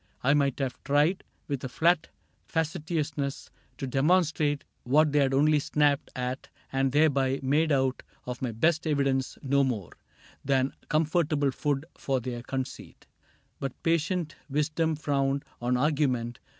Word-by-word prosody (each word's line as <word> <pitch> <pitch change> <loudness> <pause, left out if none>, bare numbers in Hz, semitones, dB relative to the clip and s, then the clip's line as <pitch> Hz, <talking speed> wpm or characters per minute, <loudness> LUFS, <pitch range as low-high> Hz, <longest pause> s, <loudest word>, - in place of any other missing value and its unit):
I 140 +3 +4
might 140 -3 +2
have 135 -3 -3
tried, 150 +7 +2 0.2
With 140 -3 -3
a 130 - -3
flat 165 +4 +2 0.4
facetiousness, 155 -3 -2 0.3
to - - -3
demonstrate 150 +1 +2 0.2
What 150 +4 +3
they 145 - +3
had 135 -2 +3
only 150 +3 +4
snapped 145 0 +1
at 125 +1 -4 0.2
and 135 0 +1
thereby 140 -2 +3
Made 150 +4 +2
out 135 -2 +1 0.2
of 125 0 -5
my 125 -3 -1
best 155 +8 +1
evidence 140 -3 0
no 140 +1 +3
more 110 - -2 0.5
Than 135 0 +1 0.2
comfortable 155 -2 +2
food 145 +2 -1
for 135 -1 -1
their 120 0 -5
conceit; 130 +1 -6 0.5
But 135 -2 -5
patient 165 -1 0
wisdom 155 +3 0
frowned 140 -2 0 0.2
on 125 +1 +1
argument. 130 -4 0
140 Hz, 135 wpm, -28 LUFS, 130-155 Hz, 0.5 s, I